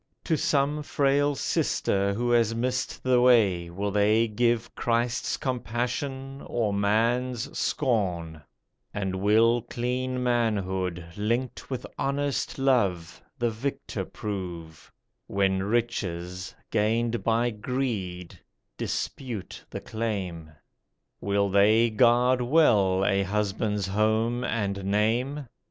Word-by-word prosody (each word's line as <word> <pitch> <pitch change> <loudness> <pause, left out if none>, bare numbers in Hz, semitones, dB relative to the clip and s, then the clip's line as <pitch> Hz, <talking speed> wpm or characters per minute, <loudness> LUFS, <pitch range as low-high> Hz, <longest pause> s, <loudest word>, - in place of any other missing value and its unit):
To 160 - +1
some 150 -1 +1
frail 145 0 +1
sister 100 -4 0
who 120 +2 0
has 115 -1 +3
missed 125 +2 -2
the 125 -1 +3
way 100 -9 +4
Will 100 +4 -3
they 105 +3 +3
give 115 +1 0
Christ's 120 0 0
compassion, 130 +2 -3
or 110 -4 0
man's 115 +4 0
scorn; 90 - -1 0.5
And 95 -2 -2
will 110 +4 +4
clean 125 +2 -2
manhood, 95 -7 0
linked 115 +5 -2
with 130 -2 -4
honest 140 0 -1
love, 100 -11 +1 0.2
The 120 -3 0
victor 130 +6 -4
prove, 85 -6 -7 0.4
When 95 -1 +1
riches, 95 -5 -2 0.2
gained 115 +2 +1
by 115 +1 +2
greed, 105 -6 -4 0.4
dispute 120 -8 -4
the - - -6
claim? 95 -8 -4 0.7
Will 100 0 +1
they 105 +4 +4
guard 125 +3 +4
well 105 -9 +3
a 100 0 +2
husband's 105 +1 -1
home 110 +4 +1
and 100 -3 -2
name. 115 +8 0
115 Hz, 105 wpm, -27 LUFS, 100-125 Hz, 0.7 s, way